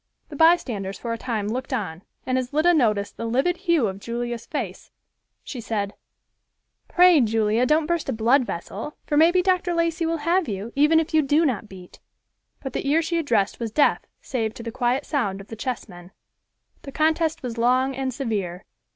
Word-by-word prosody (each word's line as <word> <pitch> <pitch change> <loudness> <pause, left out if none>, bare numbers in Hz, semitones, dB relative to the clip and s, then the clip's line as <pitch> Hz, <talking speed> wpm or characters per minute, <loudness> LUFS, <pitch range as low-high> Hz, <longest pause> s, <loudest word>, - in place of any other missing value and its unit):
The 300 - -8
bystanders 245 - +2
for 230 -1 -4
a - - -3
time 220 -5 -2
looked 255 +6 -4
on, 190 -10 -3 0.2
and 255 0 +1
as 255 -1 -5
Lida 315 +4 +3
noticed 210 -9 +1
the 230 - -4
livid 270 +10 +1
hue 340 - +2
of 195 -1 -3
Julia's 235 +1 -4
face, 230 - -5 0.5
she 250 - -7
said, 205 -3 -3 0.9
"Pray, 360 -4 +6
Julia, 225 +1 +2
don't 305 +2 +3
burst 340 -2 -1
a - - +2
blood 240 +4 +3
vessel, 210 - -6
for 295 - -1
maybe 345 +4 +5
Dr. 365 -2 +1
Lacey 335 0 0
will 330 0 0
have 350 0 +2
you, 210 +2 -5
even 300 +3 +5
if 325 +1 -3
you 315 - +5
do 300 +3 +2
not 230 -6 -2
beat." 185 -2 -13 0.6
But 270 - -5
the 275 - -2
ear 320 +3 +3
she 335 +1 -1
addressed 225 -10 0
was 230 -1 -3
deaf 290 +6 +3 0.2
save 225 -4 -2
to 230 - -8
the 230 - -5
quiet 250 +3 0
sound 200 -10 -1
of 195 - -12
the 225 - -6
chessmen. 200 -7 -6 0.7
The 275 - -9
contest 315 +1 +1
was 235 -2 -5
long 255 +3 +2
and 265 0 -2
severe. 205 -8 -3
255 Hz, 190 wpm, -24 LUFS, 220-310 Hz, 0.9 s, Pray